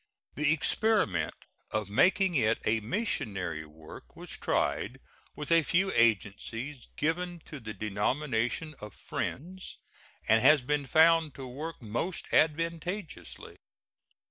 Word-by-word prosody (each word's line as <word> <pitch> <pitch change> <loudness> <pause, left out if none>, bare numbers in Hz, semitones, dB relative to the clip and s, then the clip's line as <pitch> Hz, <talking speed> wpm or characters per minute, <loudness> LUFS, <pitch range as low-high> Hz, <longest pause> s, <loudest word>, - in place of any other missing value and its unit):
The 150 +1 +2
experiment 160 - +2 0.3
of 105 -2 -2
making 185 - +3
it 115 -6 +3
a 110 +1 +2
missionary 105 - -3
work 80 +1 -13
was - - -9
tried - - -1 0.4
with 150 +2 -5
a 165 0 +6
few 185 +6 +1
agencies 115 - 0
given 175 +3 -1
to 150 - -8
the 110 -3 -7
denomination 120 +7 -1
of 105 -2 -9
Friends, 185 +7 -5 0.5
and 110 +1 +5
has 145 0 +6
been 145 +1 -1
found 160 0 +5
to 135 - -7
work 145 +3 -7
most 120 - -3
advantageously. 165 - -1
145 Hz, 115 wpm, -30 LUFS, 110-165 Hz, 0.5 s, a